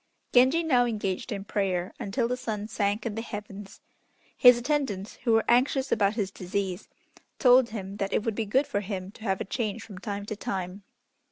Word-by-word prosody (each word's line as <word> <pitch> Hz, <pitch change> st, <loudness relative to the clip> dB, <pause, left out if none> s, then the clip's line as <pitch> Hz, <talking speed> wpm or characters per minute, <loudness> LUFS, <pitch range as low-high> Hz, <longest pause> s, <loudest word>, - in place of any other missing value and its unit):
Genji 260 Hz, +7 st, +5 dB
now 255 Hz, -7 st, +4 dB
engaged 205 Hz, -1 st, -3 dB
in 200 Hz, -2 st, -3 dB
prayer 185 Hz, -3 st, -1 dB
until 230 Hz, +4 st, -1 dB
the 250 Hz, -, -1 dB
sun 215 Hz, -4 st, -4 dB
sank 205 Hz, 0 st, -1 dB
in 230 Hz, -, -2 dB
the 225 Hz, -, -3 dB
heavens. 205 Hz, -3 st, -8 dB, 0.5 s
His 245 Hz, -1 st, +8 dB
attendants, 240 Hz, -7 st, -2 dB
who 230 Hz, -, +4 dB
were 225 Hz, -, +3 dB
anxious 260 Hz, +3 st, +2 dB
about 200 Hz, 0 st, +2 dB
his 200 Hz, -4 st, -1 dB
disease, 190 Hz, 0 st, -4 dB, 0.5 s
told 250 Hz, -1 st, +6 dB
him 200 Hz, -2 st, -6 dB
that 195 Hz, -1 st, -2 dB
it -, -, +1 dB
would 225 Hz, -, -1 dB
be 220 Hz, 0 st, -3 dB
good 265 Hz, +8 st, +2 dB
for 205 Hz, -, -1 dB
him 190 Hz, -2 st, -5 dB
to 220 Hz, -, -18 dB
have 190 Hz, -3 st, 0 dB
a -, -, -3 dB
change 225 Hz, +1 st, -3 dB
from 195 Hz, -4 st, -10 dB
time 200 Hz, 0 st, -4 dB
to 215 Hz, -, -4 dB
time. 190 Hz, -1 st, -4 dB
210 Hz, 195 wpm, -27 LUFS, 195-240 Hz, 0.5 s, His